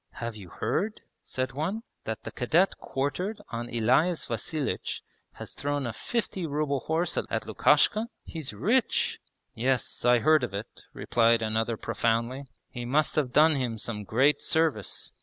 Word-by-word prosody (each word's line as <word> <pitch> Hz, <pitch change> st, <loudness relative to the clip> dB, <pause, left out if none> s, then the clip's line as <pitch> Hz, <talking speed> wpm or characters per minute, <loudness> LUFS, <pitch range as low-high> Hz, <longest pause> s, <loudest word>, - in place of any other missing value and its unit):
'Have 115 Hz, -1 st, -5 dB
you 100 Hz, -5 st, -10 dB
heard,' 210 Hz, -, -2 dB, 0.2 s
said 130 Hz, 0 st, -3 dB
one, 180 Hz, +11 st, -2 dB, 0.2 s
'that 110 Hz, -1 st, -4 dB
the -, -, -6 dB
cadet 165 Hz, +10 st, +2 dB
quartered 180 Hz, +10 st, -2 dB
on 120 Hz, +1 st, -4 dB
Elias 130 Hz, +10 st, +2 dB
Vasilich 135 Hz, +6 st, -2 dB, 0.3 s
has -, -, -8 dB
thrown 145 Hz, -1 st, -2 dB
a 120 Hz, -, -3 dB
fifty 195 Hz, -7 st, -2 dB
ruble 145 Hz, -1 st, 0 dB
horse 160 Hz, +6 st, -1 dB
at -, -, -3 dB
Lukashka? 215 Hz, +2 st, +3 dB, 0.2 s
He's 160 Hz, -5 st, -5 dB
rich! 210 Hz, -, +1 dB, 0.2 s
...' -, -, -51 dB
'Yes, 125 Hz, +1 st, -1 dB
I 120 Hz, 0 st, +6 dB
heard 155 Hz, +3 st, +4 dB
of 110 Hz, -5 st, -3 dB
it,' 105 Hz, +3 st, -7 dB
replied 115 Hz, -1 st, +2 dB
another 110 Hz, +1 st, 0 dB
profoundly, 115 Hz, +5 st, -1 dB, 0.3 s
'he 120 Hz, -, -5 dB
must 145 Hz, +6 st, +2 dB
have 140 Hz, -5 st, +1 dB
done 155 Hz, +4 st, +6 dB
him 125 Hz, -5 st, -1 dB
some 105 Hz, -1 st, -4 dB
great 130 Hz, +9 st, +3 dB
service. 155 Hz, -, 0 dB
130 Hz, 155 wpm, -28 LUFS, 115-155 Hz, 0.3 s, I